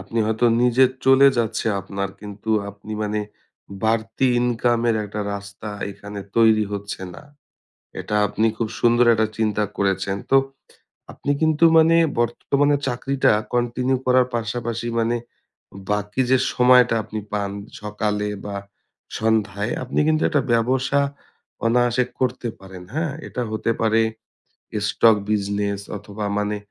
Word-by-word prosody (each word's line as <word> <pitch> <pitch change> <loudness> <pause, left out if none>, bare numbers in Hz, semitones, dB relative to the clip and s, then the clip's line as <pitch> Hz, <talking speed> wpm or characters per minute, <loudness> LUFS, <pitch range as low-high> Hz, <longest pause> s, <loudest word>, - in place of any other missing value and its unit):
আপনি 115 +4 -4
হয়তো 110 +2 0 0.2
নিজে 125 +1 +5 0.2
চলে 135 +1 +6
যাচ্ছে 115 -1 -1
আপনার 100 +1 -4
কিন্তু 105 +1 -7 0.2
আপনি 100 +2 -10
মানে 105 0 -1 0.6
বাড়তি 110 +3 +1
ইনকামের 120 -1 +1
একটা 105 +1 -5
রাস্তা 100 +1 -8 0.2
এখানে 100 +1 -8 0.2
তৈরি 110 -2 +5
হচ্ছে 100 -1 -5
না। - - -11 0.8
এটা 105 - -2
আপনি 110 +2 0
খুব 115 -1 -2
সুন্দর 120 +1 +4
একটা 110 0 +2
চিন্তা 105 -1 +1
করেছেন। 95 0 0
তো 135 - +6 0.8
আপনি 145 - -3
কিন্তু 160 +1 +3
মানে 160 +1 +5 0.2
বর্তমানে 140 +5 +1
চাকরিটা 135 +2 +1 0.2
কন্টিনিউ 125 +2 0
করার 125 0 +4
পাশাপাশি 115 0 -3
মানে 115 +1 +1 0.7
বাকি 105 +4 -1
যে 130 - +6 0.2
সময়টা 125 -1 +5
আপনি 110 +1 -6
পান 100 -1 -1 0.3
সকালে 105 0 -2 0.2
বা 100 -1 -5 0.6
সন্ধ্যায় 110 -1 0
আপনি 125 - -2
কিন্তু 155 0 +2
একটা 145 -4 +2
ব্যবসা 130 +4 +1 0.7
অনায়াসে 120 +1 +3 0.2
করতে 125 -1 -1
পারেন। 95 -1 -11
হ্যাঁ? 160 0 -1 0.2
এটা 125 - -4
হতে 110 +1 -1
পারে। 110 0 +3 0.9
স্টক 115 -2 +4
বিজনেস 100 -1 -1 0.2
অথবা 105 +1 -7
মানে 105 0 -1
115 Hz, 130 wpm, -22 LUFS, 105-125 Hz, 0.9 s, চলে